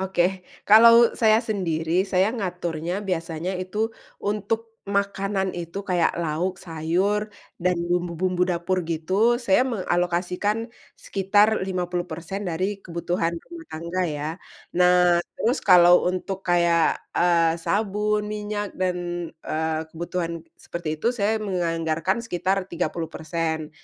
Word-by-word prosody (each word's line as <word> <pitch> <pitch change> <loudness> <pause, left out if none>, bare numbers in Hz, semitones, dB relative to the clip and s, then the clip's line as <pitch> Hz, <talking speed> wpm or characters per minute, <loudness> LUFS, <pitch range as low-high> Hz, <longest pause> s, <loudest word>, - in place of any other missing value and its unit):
Oke, 190 0 0 0.2
kalau 230 +2 +8
saya 220 -1 +4
sendiri, 180 -6 0
saya 195 +3 +1
ngaturnya 175 -3 -3
biasanya 170 +1 -2
itu 215 +4 -2 0.2
untuk 220 +2 -2 0.2
makanan 195 -1 0
itu, 175 +3 -5
kayak 175 -3 +2
lauk, 170 +3 -1
sayur, 185 +6 -1 0.3
dan 180 -1 +2
bumbu-bumbu 175 +1 0
dapur 180 0 0
gitu, 190 +9 +1
saya 240 -1 +3
mengalokasikan 185 -1 -1 0.3
sekitar 205 +2 +2
50% 180 0 -3
dari 190 +2 -2
kebutuhan 170 0 -2
rumah 335 - -11
tangga 170 +3 -3
ya. 150 -2 -3 0.4
Nah 180 -1 +4 0.2
terus 245 +5 0
kalau 180 -2 +7
untuk 190 +1 -4
kayak, 170 -2 +3 0.2
eee, 170 -2 +3
sabun, 210 0 0
minyak, 210 -1 -4
dan, 185 -1 -1 0.5
eee, 160 0 -1
kebutuhan 170 0 -3 0.2
seperti 155 -3 -5
itu, 235 +7 0
saya 220 -1 +1
menganggarkan 170 -2 -1
sekitar 195 -4 -1
30%, 165 -2 -3
180 Hz, 110 wpm, -24 LUFS, 170-205 Hz, 0.5 s, kalau